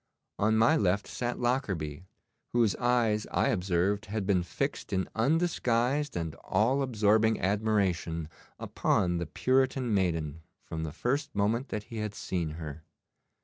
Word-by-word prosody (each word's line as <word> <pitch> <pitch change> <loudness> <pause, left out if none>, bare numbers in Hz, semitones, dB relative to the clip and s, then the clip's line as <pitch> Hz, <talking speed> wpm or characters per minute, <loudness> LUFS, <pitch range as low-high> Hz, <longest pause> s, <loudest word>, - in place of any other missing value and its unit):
On 110 +1 +3
my 115 +8 +5
left 100 - +1
sat 120 -1 -3
Lockarby, 95 - -1 0.5
whose 115 -5 +3
eyes 120 -4 +1
I - - +1
observed 95 +1 0
had 105 0 -2
been 95 -2 +3
fixed 85 - -3
in 95 -1 0
undisguised 135 - +1
and 80 -3 -3
all 115 +8 +2
absorbing 110 -3 +3
admiration 95 -5 0 0.3
upon 90 -1 0
the 85 - -3
Puritan 130 - +1
maiden 80 -5 0 0.2
from 80 - -5
the 80 -1 -3
first 140 - -2
moment 115 +6 0
that 105 -2 -3
he 115 +2 -9
had 105 -1 -3
seen 85 -4 -3
her. 75 -2 -7
105 Hz, 140 wpm, -29 LUFS, 90-120 Hz, 0.5 s, my